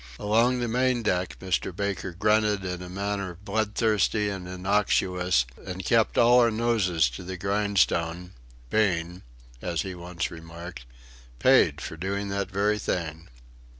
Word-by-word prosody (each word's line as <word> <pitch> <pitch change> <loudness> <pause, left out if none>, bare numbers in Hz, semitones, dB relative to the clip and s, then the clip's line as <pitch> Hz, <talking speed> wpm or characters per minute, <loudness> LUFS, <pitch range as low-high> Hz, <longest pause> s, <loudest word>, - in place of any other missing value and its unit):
Along 115 +5 +2
the 120 - -1
main 125 +1 +1
deck, 90 -3 -1
Mr. 95 -1 -2
Baker 100 -2 -2
grunted 105 +1 +1
in 90 -1 -4
a 90 - -8
manner 100 -1 -3
bloodthirsty 105 0 +1
and 95 -3 -5
innocuous; 90 -5 +1 0.2
and 95 -1 -6
kept 115 +1 +2
all 120 +1 +6
our 120 -1 +5
noses 110 - +2
to - - -8
the 95 +1 -6
grindstone, 95 -3 0 0.4
being 90 -4 +1 0.4
as 85 -3 -1
he 95 - -5
once 90 -1 -4
remarked 85 -4 -9 0.5
paid - - +4
for 80 - -6
doing 100 +3 -3
that 100 -1 -2
very 105 +2 +1
thing. 80 -3 -3
95 Hz, 140 wpm, -26 LUFS, 90-105 Hz, 0.5 s, all